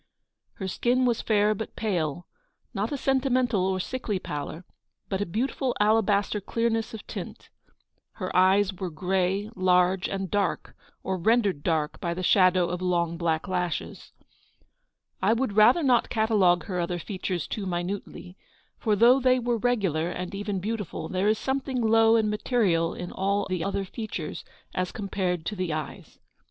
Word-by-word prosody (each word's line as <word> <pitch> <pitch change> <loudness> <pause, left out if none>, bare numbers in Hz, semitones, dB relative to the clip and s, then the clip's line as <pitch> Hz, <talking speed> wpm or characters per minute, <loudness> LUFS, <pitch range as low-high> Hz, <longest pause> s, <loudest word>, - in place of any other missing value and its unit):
Her 190 - -5
skin 245 +6 +1
was 240 -2 +1
fair 210 -1 +2
but 215 +1 -6
pale, 175 -7 -2 0.2
— - - -47
not 210 +1 -2
a 285 - -1
sentimental 255 -7 +1
or 190 -1 0
sickly 215 0 -3
pallor, 155 +1 -6 0.4
but 195 0 -1
a 205 - -1
beautiful 250 +6 -1
alabaster 210 -1 +2
clear 230 +4 0
ness 225 0 -2
of 215 - -10
tint. - - -8 0.6
Her 185 -3 -5
eyes 190 +2 +4
were 185 0 -4
grey, 190 +5 -1
large, 185 0 +2
and 195 -2 -4
dark, 200 -3 -1 0.3
or 190 -1 -2
rendered 205 -5 +2
dark 155 -2 -1
by 170 -1 -2
the 185 - -4
shadow 185 -1 +4
of 180 +1 -4
long 170 -2 0
black 165 -1 -1
lashes. 180 -2 -3 1.1
I - - +4
would 235 -2 -1
rather 235 +10 +5
not 250 -4 +3
catalogue 210 -6 +3
her 185 -4 -3
other 175 +1 -1
features 185 -1 -3
too 200 -3 -4
minutely; 180 +1 -5 0.4
for 215 -2 +1
though 240 +5 +6
they 255 -1 +3
were 240 -1 0
regular, 195 -9 0
and 180 +1 -5
even 200 -1 -3
beautiful, 205 -5 -4
there 190 +2 0
is 215 - +2
some 265 +4 -1
thing 265 -2 -4
low 225 0 +4
and 220 -2 +3
material 210 -6 +1
in 180 - -6
all 200 +2 0
the 185 -3 -2
other 200 +1 -2
features 190 -6 -6 0.3
as 185 0 -2
compared 185 -4 -2
to 210 - -3
the 185 -3 -2
eyes. 155 -1 -6
195 Hz, 165 wpm, -26 LUFS, 180-225 Hz, 1.1 s, though